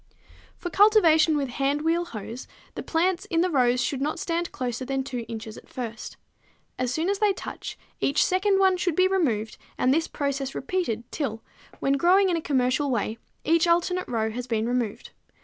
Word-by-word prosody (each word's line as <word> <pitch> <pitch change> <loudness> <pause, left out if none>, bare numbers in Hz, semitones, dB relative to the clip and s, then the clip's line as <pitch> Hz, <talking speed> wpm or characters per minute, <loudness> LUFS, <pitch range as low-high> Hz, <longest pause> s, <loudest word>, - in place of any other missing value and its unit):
For 350 - -5
cultivation 330 -7 +5
with 275 -3 -1
hand 275 +4 0
wheel 335 +2 +1
hoes 230 -2 -7 0.3
the - - -5
plants 355 +2 0
in 330 -2 +1
the 365 0 +1
rows 250 -3 +3
should 270 +1 -2
not 300 +2 -1
stand 340 +1 -2
closer 250 0 -3
than 270 +1 -2
2 250 -3 -5
inches 225 -1 -7
at - - -21
first. 230 -2 -6 0.6
As 250 -1 0
soon 315 +6 -1
as 400 0 0
they 420 -2 +3
touch, - - -7 0.2
each 280 - +2
second 385 +2 +2
one 380 -1 +4
should 350 -2 0
be 370 +2 +4
removed 245 - 0 0.2
and 255 - +3
this 325 +2 +1
process 275 -2 -3
repeated 265 -8 -2
till, 225 -7 -3 0.4
when 275 0 +2
growing 375 +5 +4
in 350 - +1
a 330 - -1
commercial 265 0 +1
way, 225 -2 -1 0.2
each 330 +2 +3
alternate 350 +2 +1
row 220 -2 -1
has 245 +2 -5
been 225 -1 0
removed. 240 -4 -2
285 Hz, 185 wpm, -26 LUFS, 245-345 Hz, 0.6 s, cultivation